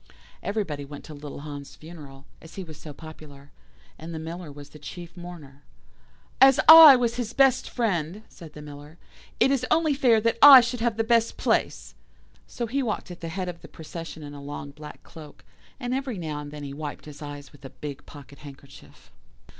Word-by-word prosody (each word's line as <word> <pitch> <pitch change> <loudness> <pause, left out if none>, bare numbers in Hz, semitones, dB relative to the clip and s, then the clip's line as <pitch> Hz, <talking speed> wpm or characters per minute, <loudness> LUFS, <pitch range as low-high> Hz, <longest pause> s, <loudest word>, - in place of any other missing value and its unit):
"Everybody 195 -9 -3
went 140 0 -10
to 155 - -11
little 145 -1 -9
Hans' 145 -1 -9
funeral, 150 -4 -13 0.2
as 160 - -14
he 195 - -6
was 155 -4 -12
so 155 - -10
popular, 145 -2 -13 0.5
and 165 +1 -8
the - - -4
Miller 165 0 -7
was 145 0 -12
the 150 - -14
chief 170 +4 -10
mourner. 165 -6 -11 0.8
"'As 270 +1 +7
I 320 -3 +11
was 240 -1 -1
his 240 -2 -4
best 265 -1 +3
friend,' 200 -4 -2
said 165 -4 -14
the 150 - -11
Miller, 145 +2 -12 0.4
'it 270 - +4
is 270 -2 0
only 315 -2 +2
fair 250 -5 +3
that 230 +1 -1
I 280 -2 +11
should 245 0 -2
have 230 -1 -1
the 225 - +1
best 230 0 +1
place'; - - -1 0.5
so 240 - -5
he 265 +5 -2
walked 215 -6 -4
at 175 - -10
the 165 - -5
head 185 +2 -4
of 175 -1 -7
the - - -12
procession 165 0 -9
in 145 0 -9
a 145 - -10
long 140 0 -8
black 150 +1 -12
cloak, 155 -2 -14 0.3
and 245 -1 -3
every 265 -4 -3
now 155 -4 -5
and 145 0 -8
then 150 0 -9
he 140 -1 -7
wiped 150 0 -7
his 150 0 -12
eyes 145 -2 -9
with 145 - -19
a 135 - -9
big 145 0 -9
pocket 140 -1 -14
handkerchief. 140 -2 -15
160 Hz, 200 wpm, -25 LUFS, 145-230 Hz, 0.8 s, I